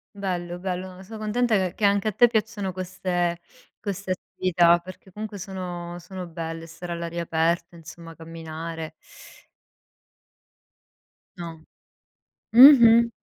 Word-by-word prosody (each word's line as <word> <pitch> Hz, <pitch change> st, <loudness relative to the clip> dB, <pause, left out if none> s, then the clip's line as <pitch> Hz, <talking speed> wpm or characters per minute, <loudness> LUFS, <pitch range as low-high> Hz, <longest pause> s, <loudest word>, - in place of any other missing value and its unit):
Bello, 175 Hz, -3 st, -3 dB
bello, 185 Hz, 0 st, -4 dB
no, 190 Hz, -, -12 dB
sono 215 Hz, +2 st, -9 dB
contenta 220 Hz, +1 st, +1 dB
che 185 Hz, -1 st, -1 dB
che 210 Hz, -, 0 dB
anche 200 Hz, +1 st, +2 dB
a -, -, +2 dB
te 240 Hz, +5 st, +5 dB
piacciono 215 Hz, -4 st, -1 dB
queste 180 Hz, -1 st, -2 dB, 0.4 s
queste 195 Hz, -2 st, -4 dB
attività, 175 Hz, -2 st, +2 dB
perché 185 Hz, +1 st, -13 dB
comunque 210 Hz, +1 st, -6 dB
sono 175 Hz, -2 st, -6 dB
sono 185 Hz, +1 st, -8 dB
belle, 165 Hz, 0 st, -6 dB
stare 175 Hz, +1 st, -7 dB
all'aria 170 Hz, 0 st, -4 dB
aperta, 170 Hz, +1 st, 0 dB
insomma, 165 Hz, 0 st, -11 dB
camminare. 160 Hz, -1 st, -7 dB, 2.4 s
No. 165 Hz, -2 st, -8 dB, 0.9 s
Mh-mh. 235 Hz, -2 st, +9 dB
180 Hz, 120 wpm, -25 LUFS, 170-200 Hz, 2.4 s, Mh-mh